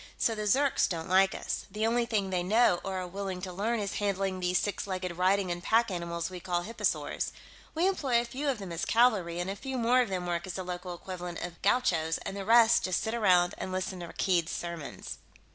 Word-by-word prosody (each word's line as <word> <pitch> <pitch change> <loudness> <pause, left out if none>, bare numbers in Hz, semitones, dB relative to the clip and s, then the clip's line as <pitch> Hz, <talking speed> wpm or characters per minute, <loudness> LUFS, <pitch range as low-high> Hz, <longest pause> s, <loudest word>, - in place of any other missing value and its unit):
So 230 - +2
the 215 -1 -3
Zirks 275 +6 +3
don't 165 -2 -3
like 190 +1 +4
us. - - -4
The 215 +1 -1
only 235 +1 +1
thing 205 -5 0
they 180 -1 +1
know 200 0 +3
or 190 -1 -3
are - - -4
willing 190 0 -4
to 185 -2 -5
learn 220 +5 0
is 200 -2 -3
handling 195 -2 -1
these 180 0 +1
six 205 +1 -2
legged 185 -2 -3
riding 185 +1 +2
and 175 0 -3
pack 225 +3 +2
animals 170 -1 -3
we 180 - -6
call 175 0 -1
hipposaurs. 230 +5 -1 0.4
We 340 +4 +3
employ 275 -11 +2
a 240 - -2
few 275 +5 -3
of 265 - 0
them 195 -4 -7
as 170 0 -3
cavalry, 210 -8 +3
and 175 - -2
a 195 - -3
few 265 +4 -5
more 245 +2 +4
of 240 - -1
them 185 -2 -2
work 175 0 -2
as 185 - -4
the 185 - -3
local 180 0 -5
equivalent 175 -1 -6
of 175 -1 -7
gauchos, 170 -7 +2
and 195 - -4
the 200 -1 -5
rest 230 +1 +6
just 185 -1 0
sit 220 - -2
around 180 -6 +4
and 185 - -4
listen 185 0 -3
to 170 - -6
Rakkeed's 170 -1 0
sermons." 170 -4 -6
190 Hz, 230 wpm, -30 LUFS, 175-225 Hz, 0.4 s, rest